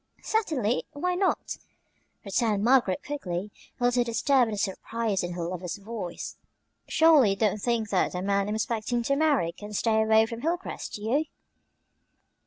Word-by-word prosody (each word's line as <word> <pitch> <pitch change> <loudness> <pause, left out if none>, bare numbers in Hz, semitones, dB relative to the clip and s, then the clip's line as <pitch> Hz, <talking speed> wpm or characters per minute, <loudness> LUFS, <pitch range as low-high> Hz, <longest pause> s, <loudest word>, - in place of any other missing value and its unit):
"Certainly; 290 - 0
why 360 +5 -1
not?" 370 +1 0 0.7
returned 205 0 +1
Margaret 235 -6 +3
quickly, 205 -9 -4 0.3
a - - -4
little 245 0 +3
disturbed 245 +2 +2
at 220 - -4
the - - -7
surprise 205 +1 -1
in 175 0 -4
her 175 -1 -4
lover's 180 +1 -4
voice. 200 -4 -6 0.5
"Surely 315 -8 +5
you 195 - +1
don't 210 0 0
think 230 -2 0
that 185 - +1
the 180 0 -3
man 200 0 +1
I'm 210 - -1
expecting 230 +2 -1
to 275 +4 +1
marry 285 - +2
can 210 +4 -10
stay 220 +1 +2
away 220 0 +5
from 230 +1 -7
Hilcrest; 345 +5 -3
do 210 - -6
you?" 275 +8 +1
220 Hz, 165 wpm, -27 LUFS, 200-260 Hz, 0.7 s, Surely